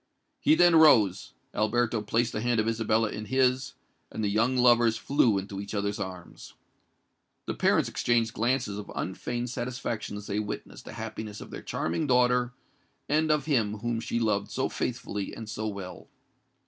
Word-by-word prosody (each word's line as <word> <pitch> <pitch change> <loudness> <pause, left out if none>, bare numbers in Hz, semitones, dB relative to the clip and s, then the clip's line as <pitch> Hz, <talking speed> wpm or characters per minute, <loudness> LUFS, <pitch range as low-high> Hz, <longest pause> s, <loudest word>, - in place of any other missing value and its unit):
He 155 - +4
then 175 0 +5
rose: 110 - +5 0.2
Alberto 115 +1 +1
placed 115 +3 0
the 105 - -2
hand 120 -1 +1
of 110 - +1
Isabella 115 -1 +1
in 105 - -6
his; 130 +3 +1 0.4
and 110 - -4
the 100 - +1
young 115 +5 +2
lovers 120 -2 +4
flew 120 -7 +2
into 100 0 -5
each 100 +1 -6
other's 100 0 -1
arms. 90 -2 -8 0.9
The - - -2
parents - - +2
exchanged 115 -1 +1
glances 120 -3 0
of 105 - -8
unfeigned 120 +6 -3
satisfaction 120 -4 -4
as 105 - -8
they 105 0 -2
witnessed 105 -1 -6
the - - -8
happiness 105 -1 -6
of - - -10
their - - -7
charming 85 - -2
daughter 125 -1 +3 0.6
and 155 +2 +2
of 150 -2 +2
him 115 -9 +1
whom 120 +2 -2
she 115 +1 -2
loved 105 -3 0
so - - -1
faithfully 100 -1 -4
and 115 - -8
so 110 0 -4
well. 100 -3 -7
115 Hz, 170 wpm, -28 LUFS, 105-125 Hz, 0.9 s, then